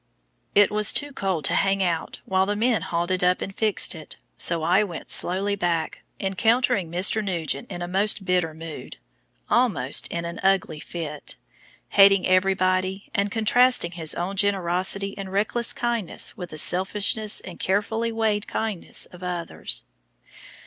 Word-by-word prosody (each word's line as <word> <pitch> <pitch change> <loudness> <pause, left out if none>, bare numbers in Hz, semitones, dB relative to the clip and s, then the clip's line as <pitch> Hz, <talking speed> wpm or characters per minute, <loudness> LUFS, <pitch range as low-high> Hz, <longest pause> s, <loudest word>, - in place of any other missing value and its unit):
It 205 -1 +5
was 210 0 +6
too 290 -1 -1
cold 185 - -2
to - - +4
hang 195 0 +1
about 170 -3 -3
while 190 0 +1
the 205 - -1
men 225 -2 +1
hauled 170 0 -3
it 185 - 0
up 180 0 +2
and 195 - -6
fixed 215 -2 +2
it, 155 -3 -10 0.2
so 165 -2 +1
I 180 +5 +3
went 175 -6 -6
slowly 195 +3 +2
back, 170 -4 -2 0.2
encountering 220 0 +1
Mr. 185 +5 +2
Nugent 165 -7 -2
in 175 - -6
a - - -4
most 195 +2 +1
bitter 180 -3 0
mood 160 -1 -9 0.5
almost 210 - +1
in 170 0 -5
an 170 0 -6
"ugly 190 -5 +1
fit" 150 -2 -6 0.5
hating 195 -1 +5
everybody, 185 +1 0
and 200 0 0
contrasting 230 -3 +3
his 165 -3 -1
own 185 +3 -4
generosity 195 0 +1
and 195 -1 -6
reckless 215 +4 +1
kindness 235 -6 0
with 180 -5 -8
the 155 - -8
selfishness 200 +5 +2
and 180 - -10
carefully 220 +4 -1
weighed 220 -2 -1
kindnesses 215 -5 -4
of 180 - -13
others. 175 -2 -4
190 Hz, 155 wpm, -23 LUFS, 175-205 Hz, 0.5 s, was